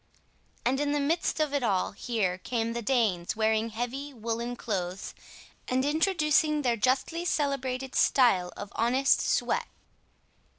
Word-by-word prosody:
And 265 Hz, +2 st, +2 dB
in 290 Hz, 0 st, 0 dB
the 295 Hz, -, +1 dB
midst 320 Hz, +3 st, 0 dB
of 305 Hz, -2 st, 0 dB
it 285 Hz, -, +1 dB
all 200 Hz, -6 st, +1 dB
here 200 Hz, -4 st, -2 dB
came 230 Hz, +3 st, -2 dB
the 235 Hz, -, -3 dB
Danes 215 Hz, -8 st, +1 dB
wearing 220 Hz, +1 st, +1 dB
heavy 250 Hz, +5 st, -5 dB
woollen 235 Hz, +1 st, -3 dB
clothes 190 Hz, -5 st, -4 dB, 0.5 s
and 260 Hz, +1 st, +1 dB
introducing 305 Hz, -1 st, +2 dB
their 240 Hz, -2 st, +2 dB
justly 260 Hz, +9 st, 0 dB
celebrated 265 Hz, -5 st, -1 dB
style 190 Hz, -9 st, +3 dB
of 205 Hz, -, -8 dB
honest 255 Hz, +4 st, +3 dB
sweat. -, -, 0 dB
245 Hz, 135 wpm, -28 LUFS, 220-280 Hz, 0.5 s, style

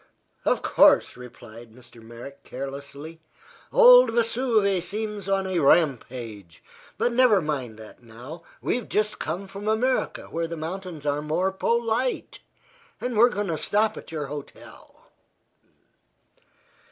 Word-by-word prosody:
"Of -, -, +1 dB
course," -, -, +4 dB
replied 120 Hz, -2 st, -13 dB
Mr. 120 Hz, -1 st, -17 dB
Merrick, 120 Hz, +5 st, -11 dB
carelessly. 140 Hz, +4 st, -8 dB, 0.5 s
"Old -, -, +8 dB
Vesuve 225 Hz, -5 st, +1 dB
seems 210 Hz, 0 st, -5 dB
on 195 Hz, -1 st, +1 dB
a 185 Hz, -2 st, -1 dB
rampage. 120 Hz, -, 0 dB, 0.3 s
But 240 Hz, -, 0 dB
never 240 Hz, -5 st, +5 dB
mind 135 Hz, -9 st, -4 dB
that 110 Hz, +2 st, -13 dB
now. 120 Hz, +8 st, -11 dB, 0.2 s
We've 245 Hz, -, -2 dB
just 210 Hz, 0 st, -1 dB
come 175 Hz, +5 st, -4 dB
from 200 Hz, +2 st, -8 dB
America, 245 Hz, +4 st, 0 dB
where 165 Hz, 0 st, -4 dB
the 165 Hz, 0 st, -6 dB
mountains 165 Hz, -1 st, -6 dB
are 145 Hz, 0 st, 0 dB
more 165 Hz, +5 st, 0 dB
polite, 235 Hz, +5 st, -1 dB, 0.6 s
and 245 Hz, -1 st, -3 dB
we're 235 Hz, +3 st, +6 dB
going 205 Hz, -4 st, -3 dB
to 160 Hz, -, -1 dB
stop 215 Hz, +6 st, +1 dB
at -, -, -11 dB
your 155 Hz, -2 st, -4 dB
hotel." 145 Hz, 0 st, -11 dB
170 Hz, 130 wpm, -25 LUFS, 140-215 Hz, 0.6 s, Old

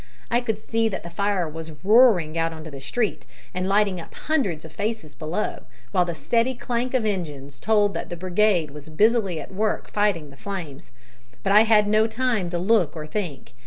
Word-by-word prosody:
I 240 Hz, +1 st, +3 dB
could 225 Hz, -4 st, -1 dB
see 225 Hz, +1 st, 0 dB
that 195 Hz, -, -5 dB
the 170 Hz, -, -8 dB
fire 200 Hz, -1 st, 0 dB
was 160 Hz, +1 st, -7 dB
roaring 205 Hz, -7 st, +5 dB
out 165 Hz, 0 st, 0 dB
into 160 Hz, 0 st, -9 dB
the 140 Hz, -, -8 dB
street, 205 Hz, -, -2 dB, 0.3 s
and 185 Hz, +1 st, -2 dB
lighting 200 Hz, -3 st, +2 dB
up -, -, -13 dB
hundreds 205 Hz, -, -1 dB
of 160 Hz, -, -10 dB
faces 205 Hz, -6 st, -3 dB
below, 165 Hz, +7 st, -3 dB, 0.3 s
while 180 Hz, +4 st, +3 dB
the 170 Hz, -1 st, -4 dB
steady 230 Hz, -, +1 dB
clank 245 Hz, +2 st, -2 dB
of 240 Hz, -4 st, +1 dB
engines 145 Hz, -9 st, -4 dB
told 205 Hz, -, +3 dB
that -, -, -4 dB
the 175 Hz, -, -5 dB
brigade 185 Hz, -3 st, +2 dB
was 150 Hz, +1 st, -11 dB
busily 200 Hz, 0 st, +2 dB
at 155 Hz, -, -9 dB
work 215 Hz, +2 st, -1 dB
fighting 195 Hz, -8 st, 0 dB
the 140 Hz, -, -16 dB
flames. 170 Hz, -8 st, -7 dB, 0.5 s
But -, -, +1 dB
I 210 Hz, +2 st, +7 dB
had 215 Hz, -2 st, +5 dB
no 215 Hz, +1 st, +4 dB
time 230 Hz, -6 st, 0 dB
to 175 Hz, -, -2 dB
look 185 Hz, -3 st, +2 dB
or 155 Hz, -1 st, -5 dB
think. 155 Hz, -7 st, -5 dB
190 Hz, 200 wpm, -24 LUFS, 160-220 Hz, 0.5 s, I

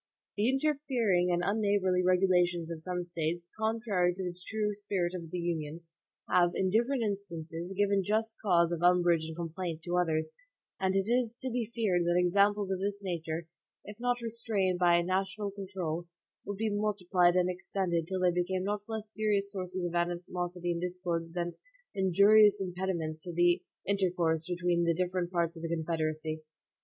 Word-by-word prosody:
The 210 Hz, +4 st, +2 dB
interfering 265 Hz, -10 st, +1 dB
and 175 Hz, 0 st, +1 dB
unneighborly 200 Hz, -3 st, +2 dB
regulations 180 Hz, -2 st, +2 dB
of 160 Hz, -1 st, -5 dB
some 180 Hz, +1 st, -3 dB
States, 170 Hz, 0 st, -3 dB
contrary 220 Hz, -5 st, +1 dB
to 190 Hz, -, -4 dB
the 180 Hz, -1 st, -4 dB
true 210 Hz, -1 st, -1 dB
spirit 200 Hz, -4 st, -2 dB
of 170 Hz, -3 st, -6 dB
the 180 Hz, -, -4 dB
Union, 165 Hz, -2 st, -3 dB, 0.5 s
have, 175 Hz, -1 st, +3 dB
in 190 Hz, -1 st, +1 dB
different 240 Hz, +4 st, +2 dB
instances, 175 Hz, -4 st, -4 dB
given 200 Hz, -1 st, +3 dB
just 220 Hz, +3 st, -1 dB
cause 170 Hz, -4 st, +3 dB
of 170 Hz, -1 st, -2 dB
umbrage 175 Hz, -2 st, +4 dB
and 160 Hz, -, -6 dB
complaint 165 Hz, 0 st, -4 dB
to 175 Hz, +2 st, -1 dB
others, 160 Hz, -3 st, +1 dB, 0.5 s
and 190 Hz, 0 st, +1 dB
it 195 Hz, +1 st, +1 dB
is 240 Hz, -1 st, +1 dB
to 260 Hz, -, -2 dB
be 235 Hz, -2 st, -1 dB
feared 200 Hz, -7 st, +2 dB
that 175 Hz, +1 st, +2 dB
examples 200 Hz, +2 st, +3 dB
of 190 Hz, -, -1 dB
this 200 Hz, +1 st, -2 dB
nature, 165 Hz, -3 st, -3 dB, 0.4 s
if 210 Hz, +2 st, -10 dB
not 245 Hz, 0 st, 0 dB
restrained 215 Hz, -5 st, -1 dB
by 175 Hz, -1 st, +5 dB
a 170 Hz, -, +3 dB
national 190 Hz, +3 st, -1 dB
control, 185 Hz, -4 st, -4 dB, 0.4 s
would 205 Hz, -, -3 dB
be 220 Hz, 0 st, 0 dB
multiplied 185 Hz, -4 st, +2 dB
and 180 Hz, -1 st, +3 dB
extended 180 Hz, -2 st, -2 dB
till 190 Hz, 0 st, -2 dB
they 180 Hz, -1 st, +4 dB
became 180 Hz, +1 st, -1 dB
not 205 Hz, +1 st, -1 dB
less 220 Hz, -1 st, -5 dB
serious 205 Hz, -2 st, 0 dB
sources 185 Hz, -2 st, -3 dB
of 175 Hz, -, -3 dB
animosity 175 Hz, 0 st, -2 dB
and 170 Hz, 0 st, -2 dB
discord 175 Hz, -2 st, -3 dB
than 175 Hz, -1 st, -2 dB, 0.4 s
injurious 200 Hz, +2 st, +5 dB
impediments 180 Hz, -4 st, -3 dB
to 175 Hz, -, -6 dB
the 175 Hz, +1 st, +3 dB, 0.3 s
intercourse 175 Hz, -5 st, +1 dB
between 175 Hz, -1 st, +1 dB
the 170 Hz, -1 st, +2 dB
different 180 Hz, 0 st, -1 dB
parts 170 Hz, -2 st, 0 dB
of 165 Hz, -, -9 dB
the 165 Hz, -, -3 dB
Confederacy. 155 Hz, -1 st, -2 dB
180 Hz, 170 wpm, -31 LUFS, 175-200 Hz, 0.5 s, by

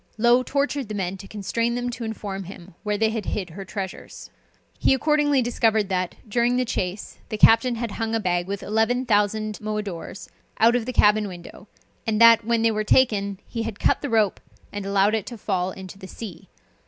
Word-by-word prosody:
Low 240 Hz, +3 st, +4 dB
tortured 280 Hz, -2 st, -1 dB
the 210 Hz, -, -4 dB
men 190 Hz, -1 st, -3 dB
to 195 Hz, +1 st, -11 dB
constrain 230 Hz, +4 st, -2 dB
them 245 Hz, 0 st, -2 dB
to 240 Hz, -, -6 dB
inform 205 Hz, -3 st, -5 dB
him 185 Hz, -1 st, -11 dB
where 210 Hz, -1 st, -1 dB
they 220 Hz, +1 st, +2 dB
had 220 Hz, -3 st, -4 dB
hid 190 Hz, -3 st, -3 dB
their 195 Hz, +5 st, -8 dB
treasures. 190 Hz, -1 st, -7 dB, 0.5 s
He 270 Hz, -, +4 dB
accordingly 290 Hz, -1 st, +2 dB
discovered 220 Hz, -3 st, +1 dB
that, 185 Hz, -1 st, -1 dB
during 240 Hz, +3 st, +1 dB
the 255 Hz, -, +1 dB
chase, 190 Hz, -3 st, -4 dB
the 215 Hz, -, -3 dB
captain 230 Hz, +3 st, +5 dB
had 230 Hz, -1 st, -4 dB
hung 225 Hz, +1 st, -2 dB
a -, -, +1 dB
bag 175 Hz, -3 st, -1 dB
with 200 Hz, 0 st, -4 dB
eleven 225 Hz, +4 st, +1 dB
thousand 215 Hz, -1 st, +1 dB
moidores 205 Hz, -4 st, -5 dB, 0.3 s
out 230 Hz, +2 st, +5 dB
of 240 Hz, -1 st, -1 dB
the -, -, -1 dB
cabin 210 Hz, -1 st, +4 dB
window, 180 Hz, +2 st, -11 dB, 0.4 s
and 215 Hz, -1 st, +1 dB
that, 230 Hz, 0 st, +7 dB
when 230 Hz, 0 st, +1 dB
they 230 Hz, -, +4 dB
were 215 Hz, 0 st, -1 dB
taken, 205 Hz, -4 st, +2 dB
he 230 Hz, -, -4 dB
had 225 Hz, -2 st, -5 dB
cut -, -, +2 dB
the 285 Hz, -, -3 dB
rope, 215 Hz, -4 st, +2 dB, 0.3 s
and 205 Hz, -1 st, -5 dB
allowed 200 Hz, +1 st, +3 dB
it 220 Hz, -2 st, -1 dB
to 240 Hz, -, -7 dB
fall 185 Hz, -3 st, -1 dB
into 190 Hz, +1 st, -10 dB
the 190 Hz, -, -9 dB
sea. 200 Hz, -3 st, -9 dB
215 Hz, 205 wpm, -24 LUFS, 195-235 Hz, 0.5 s, that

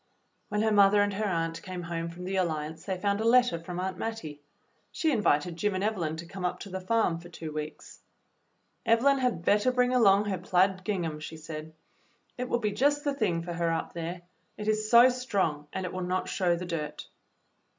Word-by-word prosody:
When 210 Hz, +1 st, 0 dB
her 220 Hz, -, +2 dB
mother 205 Hz, 0 st, +6 dB
and 205 Hz, 0 st, -1 dB
her 210 Hz, +2 st, -1 dB
aunt 165 Hz, -2 st, -1 dB
came 180 Hz, -1 st, -6 dB
home 165 Hz, 0 st, -3 dB
from 170 Hz, +2 st, -9 dB
the 190 Hz, +2 st, -3 dB
Alliance 160 Hz, -3 st, -2 dB
they 190 Hz, -2 st, -2 dB
found 200 Hz, +1 st, 0 dB
a -, -, 0 dB
letter 240 Hz, -6 st, +4 dB
from 175 Hz, +1 st, -6 dB
Aunt 185 Hz, 0 st, -3 dB
Mattie. 160 Hz, -11 st, -5 dB, 0.5 s
She 320 Hz, -, +1 dB
invited 175 Hz, -, +1 dB
Jim 205 Hz, +2 st, 0 dB
and 185 Hz, -, -1 dB
Evelyn 180 Hz, -8 st, -1 dB
to 165 Hz, -, -7 dB
come 190 Hz, +2 st, -8 dB
up 180 Hz, -, -1 dB
to 200 Hz, -, -8 dB
the 190 Hz, 0 st, -4 dB
farm 185 Hz, -4 st, +1 dB
for 175 Hz, +1 st, -12 dB
two 165 Hz, -2 st, -7 dB
weeks. 150 Hz, 0 st, -7 dB, 0.8 s
"Evelyn 255 Hz, +4 st, +4 dB
had 245 Hz, -10 st, -1 dB
better 210 Hz, +5 st, +4 dB
bring 250 Hz, 0 st, +2 dB
along 205 Hz, -4 st, +5 dB
her 195 Hz, -3 st, -2 dB
plaid 185 Hz, +1 st, +2 dB
gingham," 170 Hz, -7 st, -2 dB
she 155 Hz, +1 st, -7 dB
said. 155 Hz, 0 st, -8 dB, 0.6 s
"It 250 Hz, 0 st, -4 dB
will -, -, +2 dB
be 215 Hz, -3 st, -1 dB
just 285 Hz, +7 st, +2 dB
the 285 Hz, -2 st, 0 dB
thing 180 Hz, -10 st, 0 dB
for 175 Hz, 0 st, -5 dB
her 170 Hz, -1 st, 0 dB
up 165 Hz, -, -3 dB
here. 170 Hz, +1 st, -5 dB, 0.3 s
It 210 Hz, 0 st, -5 dB
is 215 Hz, 0 st, 0 dB
so 235 Hz, +2 st, +8 dB
strong, 195 Hz, -13 st, -1 dB
and 190 Hz, -, -3 dB
it 180 Hz, -, -5 dB
will 185 Hz, -, -3 dB
not 185 Hz, +1 st, -1 dB
show 180 Hz, -3 st, +1 dB
the 180 Hz, +1 st, -5 dB
dirt." 160 Hz, -4 st, -4 dB
185 Hz, 215 wpm, -29 LUFS, 165-215 Hz, 0.8 s, so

